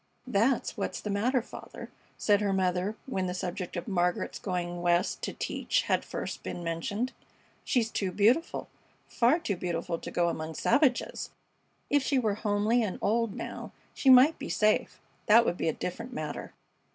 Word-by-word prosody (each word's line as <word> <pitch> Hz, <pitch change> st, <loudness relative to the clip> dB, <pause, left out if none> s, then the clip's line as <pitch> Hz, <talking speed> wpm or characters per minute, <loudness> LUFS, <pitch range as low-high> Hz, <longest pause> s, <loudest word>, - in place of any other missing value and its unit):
"That's 245 Hz, +1 st, +1 dB
what's -, -, -3 dB
the 210 Hz, -, -4 dB
matter, 235 Hz, +5 st, +1 dB
father," -, -, -10 dB, 0.3 s
said 205 Hz, -1 st, +3 dB
her 200 Hz, -2 st, +1 dB
mother, 185 Hz, +2 st, 0 dB
when 190 Hz, -8 st, -2 dB
the 180 Hz, -, -3 dB
subject 180 Hz, 0 st, -4 dB
of 175 Hz, -, -5 dB
Margaret's 180 Hz, -3 st, 0 dB
going 175 Hz, -2 st, -3 dB
West 175 Hz, 0 st, +1 dB
to -, -, -2 dB
teach -, -, -1 dB
had -, -, +1 dB
first -, -, -5 dB
been 175 Hz, -, -5 dB
mentioned. 200 Hz, +9 st, -2 dB, 0.5 s
"She's 230 Hz, -4 st, +1 dB
too 190 Hz, -2 st, -1 dB
beautiful. 230 Hz, -, +2 dB, 0.4 s
Far 245 Hz, +7 st, +3 dB
too 270 Hz, -, -2 dB
beautiful 170 Hz, -1 st, -2 dB
to -, -, -7 dB
go 175 Hz, -1 st, +1 dB
among 160 Hz, -1 st, -4 dB
savages! 255 Hz, +1 st, +1 dB, 0.6 s
If 290 Hz, -, +4 dB
she 270 Hz, +1 st, +1 dB
were 220 Hz, -5 st, +2 dB
homely 215 Hz, +3 st, +1 dB
and 210 Hz, -5 st, -2 dB
old, 230 Hz, -1 st, +1 dB
now, -, -, -6 dB, 0.2 s
she 270 Hz, -, +2 dB
might 260 Hz, +5 st, +7 dB
be -, -, -5 dB
safe. 215 Hz, 0 st, +1 dB, 0.3 s
That 230 Hz, +2 st, +7 dB
would 175 Hz, -, 0 dB
be -, -, 0 dB
a -, -, 0 dB
different 230 Hz, -, -5 dB
matter." 150 Hz, -5 st, -5 dB
205 Hz, 170 wpm, -29 LUFS, 180-235 Hz, 0.6 s, might